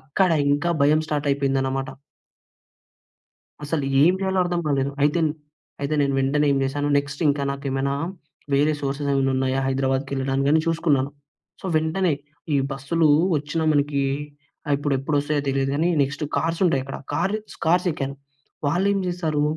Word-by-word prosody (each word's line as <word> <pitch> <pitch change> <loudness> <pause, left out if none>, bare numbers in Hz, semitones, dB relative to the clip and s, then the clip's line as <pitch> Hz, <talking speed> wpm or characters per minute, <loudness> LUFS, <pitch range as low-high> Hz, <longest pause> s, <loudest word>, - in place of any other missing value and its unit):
అక్కడ 170 +7 +1 0.2
ఇంకా 155 +4 +1
భయం 150 +2 +4
స్టార్టయిపోయిందనమాట. 135 -2 0 1.8
అసలు 145 0 -1 0.2
ఏం 170 +5 +6
జేయాలో 190 -1 0
అర్థం 175 -1 -1
గాలేదు. 140 -1 0
అయితేన్ 155 +2 +3 0.5
అయితే 140 +2 0
నేను 140 -1 +1
వెంటనే 140 +3 +2
ఏం 140 - +2
జేశాను, 145 +2 -1
నెక్స్టింకా 145 0 0
నాకేమైనా 140 0 -2 0.6
వేరే 150 +2 +3
సోర్సెస్ 140 +1 -2
ఏమైనా 135 -1 +2
ఉన్నాయా? 130 0 0
హైదరాబాద్‌కెళ్ళడానికని 135 +2 +1
చూసుకున్నాను. 145 -5 +1 0.5
సో, - - -8
వెంటనే, 160 +3 +1 0.4
ఈ - - +3 0.2
బస్సులు 155 +4 +1 0.3
వచ్చినా 150 +3 -2
మనకీ 145 -1 +1 0.7
ఆహ్, 145 - +2
ఇప్పుడు 145 -1 -1
ఎప్పుడొస్తాయో 145 +1 0
తెలీదు 135 0 0
గానీ, 165 +4 +2
నెక్స్టు 140 +2 -1
కార్సుంటాయక్కడ. 165 -5 0 0.2
కారిచ్ 210 +5 -2
కార్సెక్కాను. 160 -5 +1 0.5
వాళ్ళేం 195 +6 +2
జేశారు, 160 -4 -1
145 Hz, 125 wpm, -23 LUFS, 135-160 Hz, 1.8 s, ఏం